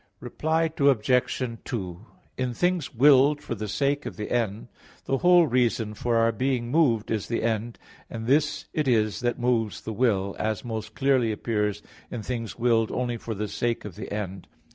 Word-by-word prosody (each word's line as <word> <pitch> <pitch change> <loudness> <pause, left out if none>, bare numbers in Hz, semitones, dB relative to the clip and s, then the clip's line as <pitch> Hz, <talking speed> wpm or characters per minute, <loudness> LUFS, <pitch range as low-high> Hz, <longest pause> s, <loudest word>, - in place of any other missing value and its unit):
Reply 160 +1 -1
Obj. 125 -2 +2 0.2
2: 95 -5 -5 0.3
In 130 -1 -2
things 180 -2 0
willed 140 +3 +6
for 120 - -5
the 110 -1 -4
sake 140 +6 0
of - - -7
the 105 - -5
end, 110 -3 -1 0.4
the 135 - 0
whole 175 -1 +6
reason 115 -5 +1
for 120 +2 -1
our 115 0 +4
being 120 +1 -1
moved 130 -9 +2
is 110 -3 -1
the 115 - -2
end, 115 0 -1 0.3
and 110 -1 -6
this 150 +4 +1
it 150 -3 0
is 110 -4 +2
that 120 -1 -1
moves 120 -4 0
the 110 - -5
will, 100 -4 +1
as 110 +2 -2
most 110 -2 -5
clearly 130 -4 +2
appears 105 -2 -1 0.3
in 115 -3 -5
things 115 -2 -4
willed 115 -2 +2
only 120 -1 -2
for 115 0 -5
the 105 +1 -3
sake 120 +1 -2
of 105 - -7
the - - -8
end. 95 -3 -5
115 Hz, 180 wpm, -26 LUFS, 110-130 Hz, 0.4 s, willed